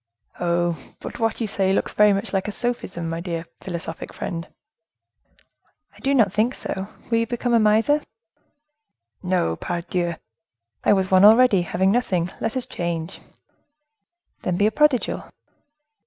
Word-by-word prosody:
"Oh! 170 Hz, -4 st, -1 dB
but -, -, -8 dB
what 225 Hz, -1 st, 0 dB
you 230 Hz, -, 0 dB
say 195 Hz, -2 st, 0 dB
looks 195 Hz, -, 0 dB
very 210 Hz, 0 st, +5 dB
much 195 Hz, +1 st, -2 dB
like 195 Hz, +1 st, 0 dB
a -, -, -2 dB
sophism, 200 Hz, -8 st, -3 dB
my 165 Hz, 0 st, -3 dB
dear 170 Hz, -1 st, -4 dB
philosophic 170 Hz, -3 st, -5 dB
friend." 165 Hz, -2 st, -4 dB, 1.5 s
"I -, -, -17 dB
do 275 Hz, +1 st, +1 dB
not 210 Hz, -7 st, +3 dB
think 225 Hz, +5 st, +1 dB
so. 190 Hz, 0 st, -5 dB, 0.2 s
Will 230 Hz, -, +3 dB
you 230 Hz, -, 0 dB
become 240 Hz, +1 st, -1 dB
a 230 Hz, -, +6 dB
miser?" 220 Hz, +8 st, +3 dB, 1.2 s
"No, 180 Hz, -, 0 dB
pardieu! 175 Hz, -, -2 dB, 0.7 s
I -, -, +4 dB
was 190 Hz, -2 st, +2 dB
one 185 Hz, 0 st, +6 dB
already, 220 Hz, -2 st, +7 dB
having 190 Hz, +3 st, +1 dB
nothing. 185 Hz, -7 st, 0 dB
Let 225 Hz, +3 st, -2 dB
us 255 Hz, -, 0 dB
change." 170 Hz, 0 st, -4 dB, 1.2 s
"Then 180 Hz, -1 st, -1 dB
be 205 Hz, -, +4 dB
prodigal." 300 Hz, -1 st, +2 dB
195 Hz, 145 wpm, -23 LUFS, 175-225 Hz, 1.5 s, already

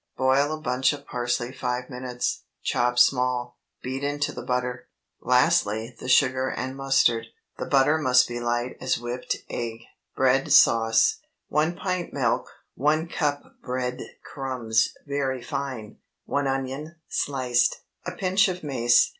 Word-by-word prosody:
Boil 135 Hz, +3 st, +3 dB
a 155 Hz, -, -3 dB
bunch 125 Hz, -2 st, +1 dB
of 145 Hz, -1 st, -9 dB
parsley 120 Hz, 0 st, -2 dB
five 125 Hz, -1 st, -3 dB
minutes, 125 Hz, -1 st, -3 dB, 0.2 s
chop 125 Hz, 0 st, +1 dB
small; 125 Hz, -1 st, +2 dB, 0.2 s
beat 130 Hz, +2 st, -4 dB
into 145 Hz, 0 st, -1 dB
the -, -, -7 dB
butter; 125 Hz, -1 st, -2 dB, 0.3 s
lastly 125 Hz, -4 st, +2 dB
the 130 Hz, -, -6 dB
sugar 130 Hz, 0 st, +3 dB
and 130 Hz, +1 st, -4 dB
mustard. 135 Hz, -4 st, +2 dB, 0.3 s
The -, -, -3 dB
butter 145 Hz, +3 st, +4 dB
must 125 Hz, -4 st, +4 dB
be 120 Hz, 0 st, -4 dB
light 120 Hz, +1 st, -2 dB
as 130 Hz, -, +1 dB
whipped 120 Hz, +1 st, -3 dB
egg. 115 Hz, -1 st, -4 dB, 0.3 s
BREAD 135 Hz, +1 st, +2 dB
SAUCE. 115 Hz, -1 st, +5 dB, 0.3 s
1 155 Hz, +4 st, +1 dB
pint 185 Hz, -2 st, -3 dB
milk. 125 Hz, -5 st, 0 dB, 0.3 s
1 155 Hz, +4 st, +1 dB
cup 145 Hz, -4 st, -1 dB, 0.2 s
bread 125 Hz, 0 st, -3 dB, 0.2 s
crumbs 125 Hz, -5 st, 0 dB, 0.2 s
(very 135 Hz, -3 st, -2 dB
fine). 130 Hz, -6 st, -5 dB, 0.3 s
1 140 Hz, 0 st, 0 dB
onion, 135 Hz, +4 st, -3 dB
sliced. 125 Hz, -3 st, 0 dB, 0.2 s
A 180 Hz, -, -5 dB
pinch 190 Hz, +2 st, +2 dB
of 180 Hz, -2 st, -4 dB
mace. 120 Hz, -4 st, +3 dB
130 Hz, 140 wpm, -25 LUFS, 120-140 Hz, 0.3 s, SAUCE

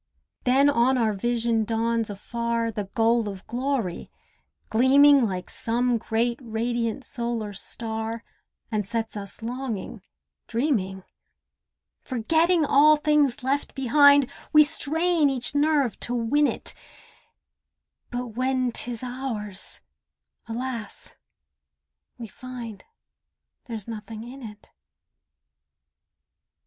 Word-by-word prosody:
Then 265 Hz, +3 st, +5 dB
on 260 Hz, -1 st, +3 dB
our 225 Hz, -3 st, +2 dB
vision 230 Hz, +1 st, 0 dB
dawns 225 Hz, 0 st, 0 dB
afar 230 Hz, +3 st, -2 dB
The 210 Hz, -2 st, -4 dB
goal 230 Hz, -1 st, +3 dB
of 195 Hz, -1 st, -9 dB
glory, 245 Hz, -7 st, -2 dB, 0.6 s
gleaming 270 Hz, +2 st, +6 dB
Like 185 Hz, -2 st, -4 dB
some 240 Hz, +1 st, 0 dB
great 235 Hz, +2 st, 0 dB
radiant 230 Hz, +1 st, -2 dB
solar 235 Hz, -3 st, -3 dB
star, 225 Hz, +2 st, -5 dB, 0.5 s
And 215 Hz, -1 st, 0 dB
sets 225 Hz, +2 st, -3 dB
us 200 Hz, +2 st, -6 dB
longing, 240 Hz, -4 st, -4 dB, 0.5 s
dreaming. 220 Hz, -7 st, -1 dB, 1.0 s
Forgetting 320 Hz, +7 st, +2 dB
all 300 Hz, +2 st, +6 dB
things 295 Hz, -4 st, +2 dB
left 275 Hz, +2 st, -1 dB
behind, 285 Hz, +1 st, +6 dB, 0.2 s
We 305 Hz, 0 st, +8 dB
strain 320 Hz, +1 st, +1 dB
each 255 Hz, -2 st, -1 dB
nerve 290 Hz, -4 st, +2 dB
to 245 Hz, -, -2 dB
win 280 Hz, +6 st, +2 dB
it, -, -, -3 dB, 1.4 s
But 245 Hz, 0 st, -4 dB
when 255 Hz, +2 st, 0 dB
'tis 235 Hz, 0 st, -3 dB
ours—alas! 235 Hz, 0 st, -6 dB, 1.0 s
we 235 Hz, -, -7 dB
find 235 Hz, -1 st, -9 dB, 0.8 s
There's 225 Hz, -4 st, -6 dB
nothing 220 Hz, 0 st, -7 dB
in 255 Hz, +3 st, -10 dB
it. 210 Hz, -3 st, -11 dB
235 Hz, 100 wpm, -25 LUFS, 225-270 Hz, 1.4 s, We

